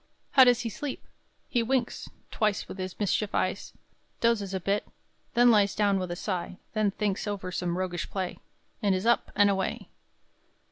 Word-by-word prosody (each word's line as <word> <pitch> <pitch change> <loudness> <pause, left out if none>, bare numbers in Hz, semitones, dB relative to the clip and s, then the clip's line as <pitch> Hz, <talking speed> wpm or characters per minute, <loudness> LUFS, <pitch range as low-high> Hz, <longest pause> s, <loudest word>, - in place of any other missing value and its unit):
How 265 - +8
does 245 -1 +4
he 235 - -2
sleep? 275 +6 -5 0.4
He 240 - +1
winks 245 +1 -1 0.2
Twice 210 -3 0
with 190 - -8
his 185 0 -5
mischief 205 0 0
eyes; 185 +2 -1 0.5
Dozes 225 -5 +1
a 190 - -1
bit; 200 +3 -1 0.5
then 240 0 +7
lies 205 -3 +4
Down 200 -2 +2
with 185 -1 -3
a 175 - -3
sigh; 180 -1 -3 0.2
then 215 -2 +2
thinks 205 0 -2
Over 195 -3 -3
some 175 -1 -2
roguish 180 -2 -3
play, 190 -2 -3 0.4
And 200 -2 +3
is 185 +3 -2
up 235 0 +2
and 205 0 +5
away! 195 -1 -1
200 Hz, 175 wpm, -28 LUFS, 185-225 Hz, 0.5 s, How